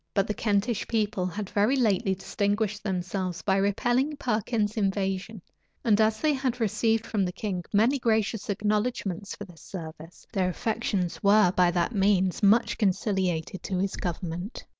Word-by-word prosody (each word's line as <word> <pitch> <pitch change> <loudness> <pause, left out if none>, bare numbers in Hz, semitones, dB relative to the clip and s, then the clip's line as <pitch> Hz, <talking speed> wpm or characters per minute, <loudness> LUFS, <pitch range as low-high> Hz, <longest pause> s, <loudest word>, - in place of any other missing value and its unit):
But 195 -2 +3
the 210 - -2
Kentish 210 +1 0
people 210 -4 0
had 200 +1 -5
very 210 +6 +3
lately 210 -5 +2
distinguished 205 +2 -1
themselves 185 -2 -3
by 195 -1 +2
repelling 240 +9 +1
Perkin's 220 -4 -1
invasion; 195 -1 -2 0.4
and 220 -2 +4
as 215 0 +2
they 310 -1 +2
had 260 -2 -1
received 225 +1 +1
from 210 -3 0
the 180 - -1
king 185 -2 -4
many 230 +7 +3
gracious 220 -2 0
acknowledgments 210 -2 -1
for 205 - -8
this 175 -4 -16
service, 165 -2 -9
their 185 -3 +1
affections 185 -4 -2
were 200 -2 +5
by 180 -1 +3
that 175 +5 0
means 190 -2 +2
much 220 +3 +3
conciliated 190 -4 0
to 190 - -3
his 195 +1 -1
government. 175 +3 -5
205 Hz, 155 wpm, -27 LUFS, 185-220 Hz, 0.4 s, were